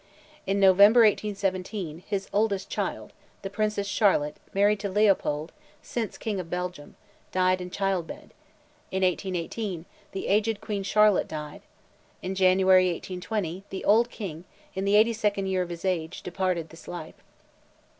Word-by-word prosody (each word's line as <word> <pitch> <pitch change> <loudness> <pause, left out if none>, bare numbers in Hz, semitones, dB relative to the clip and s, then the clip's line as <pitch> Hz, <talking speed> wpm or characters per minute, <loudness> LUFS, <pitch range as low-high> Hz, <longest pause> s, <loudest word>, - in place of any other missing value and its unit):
In 195 +1 +1
November, 200 +4 +7
1817, 195 -5 0
his 200 -2 -2
oldest 205 -1 0
child, - - -3 0.3
the 195 - -5
Princess 210 -1 -1
Charlotte, 190 -7 +2
married 205 +1 +3
to 200 -1 -3
Leopold, 185 -6 +1 0.3
since 230 -3 -4
King 210 -3 -3
of 170 -2 -6
Belgium, 180 -4 -5 0.4
died 185 0 +2
in 180 - -6
childbed; 190 -3 -3 0.6
in 190 0 -1
1818, 185 0 -2 0.3
the 195 - -5
aged 210 +1 +1
Queen 210 -2 -3
Charlotte 210 +1 +3
died; 150 -1 -7 0.6
in 185 - -2
January, 185 0 +5
1820, 180 +1 -4
the 190 - -6
old 230 +4 +4
King, 175 -9 -7 0.3
in 190 +1 -3
the 200 +1 +3
eighty 220 +2 +5
second 205 -3 0
year 190 -1 0
of 180 - -3
his 170 +1 -7
age, 175 -3 -2
departed 180 -2 -2
this 165 - -14
life. 165 -3 -8
190 Hz, 145 wpm, -27 LUFS, 180-205 Hz, 0.6 s, November